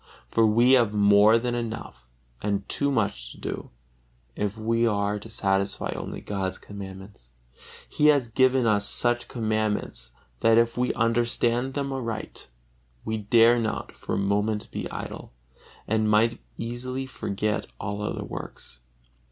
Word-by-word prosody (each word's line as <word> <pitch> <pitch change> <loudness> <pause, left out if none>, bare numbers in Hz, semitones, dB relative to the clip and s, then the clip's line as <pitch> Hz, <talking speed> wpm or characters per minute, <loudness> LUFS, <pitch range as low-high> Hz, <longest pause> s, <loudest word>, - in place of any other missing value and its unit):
For 115 -1 +3
we 120 +4 +4
have 120 -5 +4
more 105 +2 +6
than 120 +1 -1
enough 110 - -5 0.3
and 100 -1 -1
too 140 - 0
much 100 - -1
to - - -16
do, - - -5 0.7
if 105 +1 -2
we 115 +1 +1
are 100 -1 0
to 110 - -11
satisfy 100 -2 -1
only - - -6
God's 95 -2 -3
commandments. 95 -8 -10 0.6
He 150 - +2
has 145 -5 +4
given 130 +2 +3
us 105 -2 +2
such 120 0 +2
commandments 110 - -1 0.3
that 115 0 +4
if 115 0 +3
we 125 0 +1
understand 120 +2 +1
them 140 -1 -2
aright, 115 -4 -5 0.6
we 110 - -1
dare 115 +3 +5
not 110 -2 -3
for - - -5
a - - -1
moment 105 +2 0
be - - -4
idle, - - -7 0.5
and 110 0 +1
might 115 +2 +3 0.2
easily 125 +3 -4
forget 105 -4 -2
all 100 +1 -4
other 105 - -3
works. 60 - -9
110 Hz, 145 wpm, -26 LUFS, 100-120 Hz, 0.7 s, more